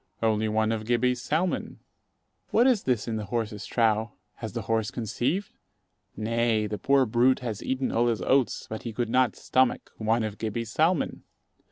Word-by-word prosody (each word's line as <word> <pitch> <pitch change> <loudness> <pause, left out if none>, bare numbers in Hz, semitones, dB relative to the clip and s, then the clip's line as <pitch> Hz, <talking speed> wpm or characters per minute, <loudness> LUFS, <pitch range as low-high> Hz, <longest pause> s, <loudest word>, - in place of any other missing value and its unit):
Only 110 -1 +2
one 110 +1 +1
of 110 -1 -2
Gibbey's 120 +1 +1
salmon. 165 +7 -1 0.7
What 235 - +4
is 245 -6 +3
this 125 -4 0
in 115 -1 -2
the 105 - -4
horse's 110 -1 -3
trough? 110 -1 +2 0.3
Has 110 -4 -6
the 115 - -3
horse 110 +1 0
conceived? 125 - -2 0.7
Nay, 115 0 +1
the 105 0 -4
poor 140 -1 +3
brute 125 +3 +3
has 115 -5 -4
eaten 130 0 -1
all 120 +1 +2
his 110 -6 0
oats, 130 +2 +2
but 110 - -6
he 115 - -6
could 120 +1 -2
not 125 +1 +2
stomach 130 -1 +1
one 110 +1 +1
of 110 -1 -4
Gibbey's 110 0 -3
salmon. 160 +1 +1
115 Hz, 175 wpm, -27 LUFS, 110-130 Hz, 0.7 s, What